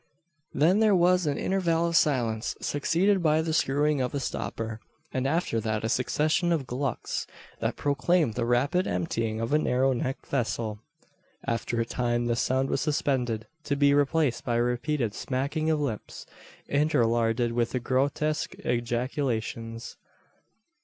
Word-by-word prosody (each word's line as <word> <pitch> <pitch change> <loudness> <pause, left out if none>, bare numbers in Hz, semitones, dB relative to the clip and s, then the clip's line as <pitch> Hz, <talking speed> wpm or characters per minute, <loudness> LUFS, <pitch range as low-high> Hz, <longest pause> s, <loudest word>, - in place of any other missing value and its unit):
Then 175 +7 +3
there 215 -3 +5
was 180 -1 +3
an 145 - 0
interval 170 -3 +1
of 170 0 -1
silence, 120 -9 +1
succeeded 180 +7 +1
by 155 -1 +3
the 160 -1 -2
screwing 145 -1 +2
of 125 +3 -2
a - - 0
stopper, 115 -4 -4 0.3
and 130 +1 0
after 150 -6 0
that 110 -1 -2
a 110 - -1
succession 155 +8 +1
of 155 -5 0
"glucks," 125 0 -3 0.3
that - - -1
proclaimed 145 -1 +1
the 120 +1 -1
rapid 140 +10 +2
emptying 110 +5 -1
of 115 +5 -2
a 150 - +5
narrow 130 -2 +2
necked 130 +2 -3
vessel. 115 -5 -2 0.7
After 115 0 -1
a 115 - +1
time 120 0 -1
this 120 0 0
sound 130 +1 +1
was - - 0
suspended, 125 -7 0 0.2
to 140 - 0
be 140 0 +4
replaced 145 -2 +2
by 120 - -1
a 120 - +3
repeated, 125 -1 -1
smacking 140 +7 -2
of 155 -1 +2
lips, 130 -8 -4 0.4
interlarded 120 -5 +2
with 120 +1 -1
grotesque 145 +4 0
ejaculations. 120 -1 -2
130 Hz, 145 wpm, -27 LUFS, 120-150 Hz, 0.7 s, there